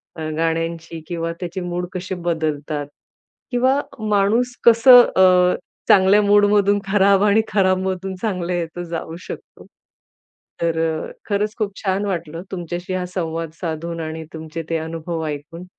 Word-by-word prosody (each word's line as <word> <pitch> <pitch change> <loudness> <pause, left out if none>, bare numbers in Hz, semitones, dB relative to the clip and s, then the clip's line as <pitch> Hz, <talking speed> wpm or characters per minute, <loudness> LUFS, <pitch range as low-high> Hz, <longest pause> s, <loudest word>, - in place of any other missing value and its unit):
अ, 155 -1 -4
गाण्यांची 165 0 -2
किंवा 165 -1 -3
त्याचे 180 +1 -5
मूड 175 0 -3
कसे 185 +1 -4
बदलतात 155 -4 -2 0.6
किंवा 260 +3 +2 0.3
माणूस 215 +5 +2
कसं 240 +2 +9 0.2
अ, 180 -1 +5 0.3
चांगल्या 195 +2 +6
मूड 205 0 +5
मधून 205 0 +3
खराब 195 0 +4
आणि 210 +1 +4
खराब 185 -2 +2
मधून 190 0 -3
चांगल्या 180 -5 -1
यात 170 0 -4
जाऊ 165 -1 -5
शकतो. - - -10 1.0
तर 165 -1 0 0.5
खरंच 210 +1 0
खूप 215 -3 -1
छान 195 +1 0
वाटलं 170 -4 -4
तुमच्याशी 175 0 -5
हा 185 -1 -1
संवाद 165 -2 -3
साधून 165 0 -4
आणि 160 0 -5
तुमचे 160 +1 -6
ते 165 - +1
अनुभव 160 +1 -4
ऐकून 150 +4 -7
180 Hz, 135 wpm, -21 LUFS, 165-200 Hz, 1.0 s, कसं